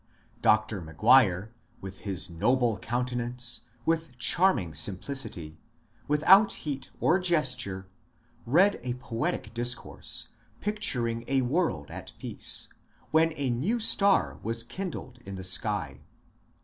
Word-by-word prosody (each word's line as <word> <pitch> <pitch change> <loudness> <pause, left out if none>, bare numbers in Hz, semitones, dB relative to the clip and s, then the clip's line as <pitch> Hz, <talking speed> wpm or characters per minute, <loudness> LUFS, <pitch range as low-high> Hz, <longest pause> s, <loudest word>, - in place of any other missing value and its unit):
Dr. 110 -2 +2
McGuire, 100 - +3 0.3
with 95 0 -9
his 95 -3 -2
noble 115 +5 +1
countenance, 120 +2 0 0.2
with 165 -5 -1
charming 125 - +2
simplicity 90 - -2 0.2
— 115 +1 -35
without 195 +7 +6
heat 140 -3 -4
or 175 +4 +3
ges 170 -8 +2
ture— 95 -6 -5 0.6
read 180 +11 +4
a 125 0 -3
poetic 115 -3 -4
discourse, 120 +1 -1 0.3
picturing 125 - -1
a 135 -1 +1
world 125 - -1
at - - -8
peace, - - 0 0.4
when 160 +1 +3
a 140 -4 -1
new 170 - -1
star 200 -3 +2
was 115 +1 -2
kindled 130 -4 -7
in 100 0 -8
the 95 - -7
sky. 95 - 0
120 Hz, 120 wpm, -28 LUFS, 105-150 Hz, 0.6 s, without